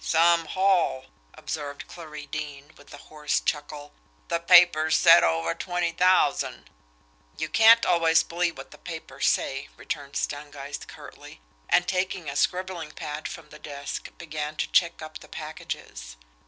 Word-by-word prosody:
"Some 170 Hz, 0 st, +3 dB
haul!" 185 Hz, -8 st, +1 dB, 0.3 s
observed 145 Hz, -2 st, -6 dB
Clarie 155 Hz, -3 st, -9 dB
Deane, 145 Hz, 0 st, -7 dB
with 145 Hz, -, -18 dB
a -, -, -10 dB
hoarse 150 Hz, 0 st, -2 dB
chuckle. 145 Hz, -1 st, -4 dB, 0.4 s
"The 170 Hz, -, 0 dB
papers 170 Hz, -3 st, +6 dB
said 170 Hz, -1 st, +7 dB
over 80 Hz, 0 st, +1 dB
twenty 175 Hz, -2 st, -2 dB
thousand." 180 Hz, -4 st, +1 dB, 0.7 s
"You -, -, -2 dB
can't 225 Hz, +1 st, +6 dB
always 165 Hz, -2 st, +4 dB
believe 170 Hz, -1 st, -2 dB
what -, -, -10 dB
the -, -, -14 dB
papers 160 Hz, -5 st, -4 dB
say," 135 Hz, +1 st, 0 dB
returned 140 Hz, -2 st, -6 dB
Stangeist 145 Hz, -1 st, -5 dB
curtly; -, -, -12 dB, 0.3 s
and, 180 Hz, 0 st, +3 dB
taking 185 Hz, -3 st, -2 dB
a 140 Hz, -, -4 dB
scribbling 180 Hz, -1 st, -1 dB
pad 150 Hz, +1 st, -6 dB
from 160 Hz, -3 st, -10 dB
the 150 Hz, -, -13 dB
desk, 140 Hz, -2 st, -6 dB
began 155 Hz, -2 st, -5 dB
to -, -, -3 dB
check 170 Hz, -2 st, +2 dB
up 155 Hz, 0 st, -9 dB
the -, -, -15 dB
packages. -, -, -8 dB
155 Hz, 145 wpm, -26 LUFS, 145-170 Hz, 0.7 s, said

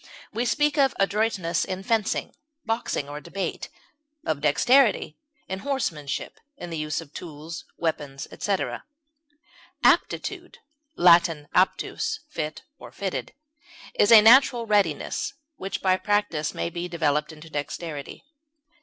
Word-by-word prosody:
We 235 Hz, +3 st, -1 dB
speak 295 Hz, +3 st, +1 dB
of 270 Hz, -2 st, +3 dB
adroitness 195 Hz, -4 st, +1 dB
in 190 Hz, 0 st, -4 dB
fencing, 220 Hz, -1 st, 0 dB, 0.3 s
boxing, 225 Hz, -10 st, -2 dB
or 145 Hz, +1 st, -7 dB
debate; 195 Hz, +4 st, -4 dB, 0.6 s
of 155 Hz, -3 st, -1 dB
dexterity 215 Hz, -, +3 dB, 0.3 s
in 190 Hz, 0 st, -4 dB
horsemanship, 175 Hz, -, -3 dB, 0.2 s
in 175 Hz, -7 st, -8 dB
the 165 Hz, -, -3 dB
use 155 Hz, +1 st, -2 dB
of 155 Hz, -3 st, -14 dB
tools, 160 Hz, 0 st, -8 dB
weapons, 145 Hz, -4 st, -3 dB
etc. 200 Hz, -2 st, -2 dB, 1.0 s
Aptitude -, -, +1 dB, 0.4 s
(L. -, -, -4 dB
aptus, 170 Hz, -, +3 dB
fit, 155 Hz, -1 st, -4 dB, 0.3 s
fitted) 195 Hz, -2 st, -4 dB, 0.6 s
is 205 Hz, -, +3 dB
a 225 Hz, -2 st, +11 dB
natural 240 Hz, 0 st, +6 dB
readiness, 210 Hz, -2 st, 0 dB, 0.2 s
which 195 Hz, +1 st, -5 dB
by 185 Hz, -1 st, +4 dB
practise 205 Hz, -8 st, 0 dB
may 170 Hz, -, -2 dB
be 175 Hz, +1 st, -4 dB
developed 150 Hz, -3 st, 0 dB
into 160 Hz, +1 st, -13 dB
dexterity. 150 Hz, -, -5 dB
175 Hz, 120 wpm, -25 LUFS, 155-215 Hz, 1.0 s, a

